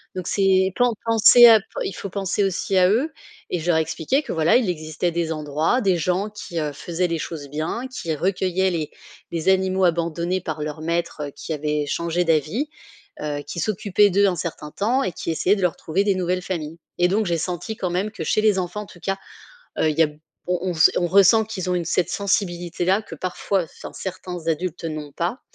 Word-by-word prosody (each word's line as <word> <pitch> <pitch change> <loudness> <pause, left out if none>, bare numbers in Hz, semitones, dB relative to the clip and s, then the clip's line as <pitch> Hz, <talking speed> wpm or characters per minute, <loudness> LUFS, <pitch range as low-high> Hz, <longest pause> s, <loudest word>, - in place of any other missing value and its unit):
Donc 185 -2 -4
c'est 190 -1 +3
pas 245 - +4
en 240 - +1
penser 230 +2 +8
à 225 -2 +8
p 195 - -16 0.2
il 195 - -3
faut 200 - -6
penser 195 +1 -1
aussi 195 0 -1
à 180 0 +5
eux» 265 +10 +1 0.4
et 180 - 0
je 165 - -6
leur 170 - +4
ai 160 - +4
expliqué 165 - -1
que - - -4
voilà, 160 0 +3
il 245 -6 0
existait 155 +1 -2
des 165 -1 -1
endroits, 155 - 0
des 190 -3 +3
gens 185 +5 0
qui, 180 -5 -6
heu, 150 -2 -2
faisaient 175 +4 -2
les 165 -1 -2
choses 150 -3 -6
bien, 160 - -3
qui 250 -11 -4
recueillaient 190 +2 0
les 160 -4 -3 0.4
les 170 +1 -3
animaux 190 0 +3
abandonnés 170 +2 0
par 155 -3 -4
leurs 150 +1 -5
maîtres, 170 -2 -2
heu, 140 - -8
qui 160 - -5
avaient 150 0 -1
changé 170 +3 -1
d'avis, 165 - +1 0.5
heu, 145 -1 -3
qui - - -5
s'occupaient 205 0 +2
d'eux 200 +2 +4
un 185 - +1
certain 155 -2 -5
temps 245 - +1
et 185 - -1
qui 165 - -5
essayaient 185 +5 +2
de 195 - -4
leur 180 - +2
trouver 175 +5 0
des 200 -1 +2
nouvelles 180 0 -1
familles. 165 -3 -5 0.2
Et 175 - +4
donc 210 +4 +1
j'ai 170 -1 +1
senti 180 +6 -4
quand 180 -4 -2
même 185 +4 -1
que 170 - -6
chez 215 - +2
les 215 -3 +3
enfants 180 +3 -3
en - - -8
tout 175 - -15
cas, 195 +2 -2 0.6
heu, - - +3
il 155 - -4
y - - +7
a 155 - +3
b 150 - -15 0.3
on 180 +1 0
on - - -7 0.2
on 175 - +1
ressent 200 +4 +6
qu'ils 195 -4 -5
ont 180 - +1
une 175 - -1
cette 175 +2 +1
sensibilité 175 -3 -1
là, 190 +4 +2
que - - -10
parfois 185 0 -1
enfin 160 - -11
certains 180 -2 -6
adultes, 170 +1 -2
heu, - - -1
n'ont 150 -2 -6
pas. 175 - -2
180 Hz, 230 wpm, -23 LUFS, 165-195 Hz, 0.6 s, penser